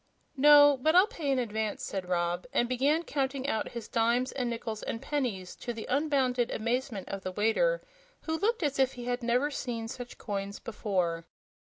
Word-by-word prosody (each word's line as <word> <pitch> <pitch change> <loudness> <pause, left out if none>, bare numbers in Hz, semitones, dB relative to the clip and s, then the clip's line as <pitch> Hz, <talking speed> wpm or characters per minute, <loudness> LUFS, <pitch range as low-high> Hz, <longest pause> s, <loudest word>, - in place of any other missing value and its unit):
"No; 290 0 +7
but 315 +4 +3
I'll 365 +2 +8
pay 340 - -4
in 270 - +2
advance," 220 -3 -2
said 185 -2 -4
Rob, 175 +2 -1
and 240 - +2
began 280 +6 +2
counting 275 -3 -2
out 220 -6 -1
his 235 -2 -6
dimes 235 +3 +1
and 250 -3 -2
nickles 230 -2 -4
and 225 - -4
pennies, 235 -11 -3
to 240 - -4
the 225 -1 -6
unbounded 260 -4 +1
amazement 235 -2 -2
of 195 - -4
the 185 - -4
waiter, 225 - +1 0.4
who 320 - -2
looked 450 -1 +1
as 280 -2 0
if 265 0 +3
he 245 -1 -8
had 245 +1 -1
never 245 +5 +1
seen 235 -5 -4
such 245 0 -8
coins 200 -1 -4
before. 180 -7 -2
245 Hz, 185 wpm, -30 LUFS, 220-280 Hz, 0.4 s, I'll